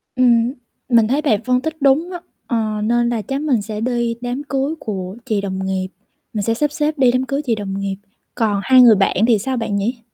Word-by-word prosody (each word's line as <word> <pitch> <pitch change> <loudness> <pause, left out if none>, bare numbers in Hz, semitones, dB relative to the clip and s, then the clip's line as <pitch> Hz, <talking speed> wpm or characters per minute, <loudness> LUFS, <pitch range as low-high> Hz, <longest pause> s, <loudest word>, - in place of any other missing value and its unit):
Ừm, 240 0 +3 0.4
mình 230 -3 +4
thấy 280 +5 +1
bạn 225 -7 +1
phân 250 0 +1
tích 315 0 -5
đúng 285 +6 +3
á, 355 - -5 0.3
ờ, 215 -3 -1
nên 240 +1 +2
là 230 -3 -1
chắc 275 +5 -4
mình 265 -8 +1
sẽ 215 0 -5
đi 235 -1 -1
đám 245 +3 -3
cưới 280 +2 -2
của 190 -1 -5
chị 215 -5 0
đồng 190 -1 -4
nghiệp, 190 -1 -2 0.5
mình 210 -2 -2
sẽ 225 - +1
sắp 295 +5 0
xếp 300 0 -1
đi 255 -2 +4
đám 255 +1 0
cưới 275 +2 -2
chị 230 -3 +1
đồng 195 -1 -4
nghiệp, 195 -1 -2 0.4
còn 210 -4 +1
hai 260 -1 +6
người 230 -3 +8
bạn 195 - +1
thì 225 -4 +4
sao 260 +4 -2
bạn 215 -3 -2
nhỉ? 230 +5 -1
235 Hz, 230 wpm, -19 LUFS, 210-265 Hz, 0.5 s, người